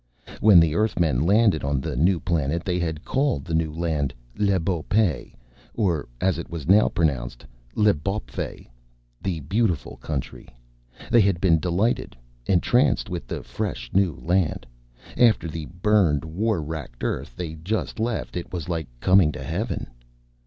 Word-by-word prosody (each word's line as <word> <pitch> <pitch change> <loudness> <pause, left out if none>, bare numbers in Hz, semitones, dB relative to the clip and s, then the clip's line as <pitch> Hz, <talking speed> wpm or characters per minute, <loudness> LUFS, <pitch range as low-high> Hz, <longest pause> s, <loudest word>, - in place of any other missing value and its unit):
When 105 -5 +7
the 80 -2 +3
Earthmen 85 - +1
landed 100 0 +3
on 70 0 0
the 65 - -4
new 85 +6 +3
planet 85 -1 -1
they 90 -1 0
had 80 -2 -3
called 135 - 0
the 85 - -5
new 80 -1 +1
land 75 -5 -2 0.2
Le 100 -2 +2
Beau 85 0 -1
Pays, 90 - +1 0.5
or, 90 - 0
as 95 -2 +1
it 85 - -7
was 80 -5 -6
now 100 +4 +5
pronounced, 60 -7 -1 0.3
L'Bawpfey 100 0 -1 0.5
The 90 -5 -2
Beautiful 90 - -1
Country. 70 -4 -5 0.6
They 120 - +6
had 95 -4 +2
been 85 -3 +4
delighted, 90 - 0 0.3
entranced 115 +4 +2
with 85 -8 -5
the - - -5
fresh - - -4
new 95 -5 +2
land. 90 -1 0 0.5
After 115 -8 +4
the 80 -1 -6
burned, 90 -5 +2
war 95 +2 -1
racked 75 -6 -7
Earth - - -3
they 85 -3 -4
had 80 0 -12
just 110 +4 -2
left, 115 +1 -2
it 90 - -5
was 85 -4 -5
like 80 -4 -3
coming 95 -4 +5
to 65 - -7
Heaven. 90 - -3
85 Hz, 155 wpm, -24 LUFS, 75-100 Hz, 0.6 s, When